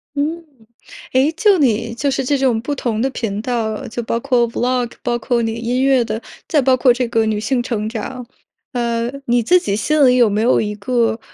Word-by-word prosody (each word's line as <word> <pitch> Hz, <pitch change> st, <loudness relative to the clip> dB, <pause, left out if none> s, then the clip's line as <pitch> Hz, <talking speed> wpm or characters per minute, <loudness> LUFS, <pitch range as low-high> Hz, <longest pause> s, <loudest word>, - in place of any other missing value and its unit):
嗯。 320 Hz, +4 st, -2 dB, 0.7 s
诶， 265 Hz, +4 st, +3 dB
就 390 Hz, +4 st, +3 dB
你 230 Hz, -4 st, +1 dB
就 280 Hz, +4 st, -1 dB
是 265 Hz, -, -1 dB
这 285 Hz, +2 st, +1 dB
种 260 Hz, -4 st, +1 dB
不 285 Hz, +5 st, -3 dB
同 230 Hz, -5 st, -2 dB
的 265 Hz, -, +1 dB
频 210 Hz, -5 st, -3 dB
道， 225 Hz, -3 st, -2 dB
就 240 Hz, +1 st, -4 dB
包 230 Hz, +1 st, -1 dB
括 240 Hz, -2 st, +1 dB
Vlog， 245 Hz, 0 st, -1 dB
包 240 Hz, -, 0 dB
括 235 Hz, +1 st, 0 dB
你 225 Hz, -1 st, -1 dB
音 235 Hz, +3 st, -1 dB
乐 270 Hz, -2 st, +4 dB
的， 220 Hz, 0 st, -4 dB, 0.3 s
再 300 Hz, -, +2 dB
包 260 Hz, 0 st, +4 dB
括 255 Hz, 0 st, +4 dB
这 250 Hz, 0 st, -1 dB
个 225 Hz, -1 st, +1 dB
女 215 Hz, -1 st, 0 dB
性 245 Hz, +4 st, 0 dB
成 225 Hz, -3 st, -3 dB
长。 245 Hz, +3 st, -6 dB, 0.5 s
呃， 235 Hz, -1 st, -1 dB
你 240 Hz, 0 st, +2 dB
自 360 Hz, +11 st, +4 dB
己 200 Hz, -, -2 dB
心 300 Hz, +7 st, +2 dB
里 250 Hz, -, +4 dB
有 240 Hz, -3 st, +5 dB
没 205 Hz, +1 st, 0 dB
有 240 Hz, +3 st, +3 dB
一 210 Hz, -1 st, -2 dB
个， 230 Hz, +2 st, 0 dB
240 Hz, 245 characters per minute, -18 LUFS, 225-260 Hz, 0.7 s, 有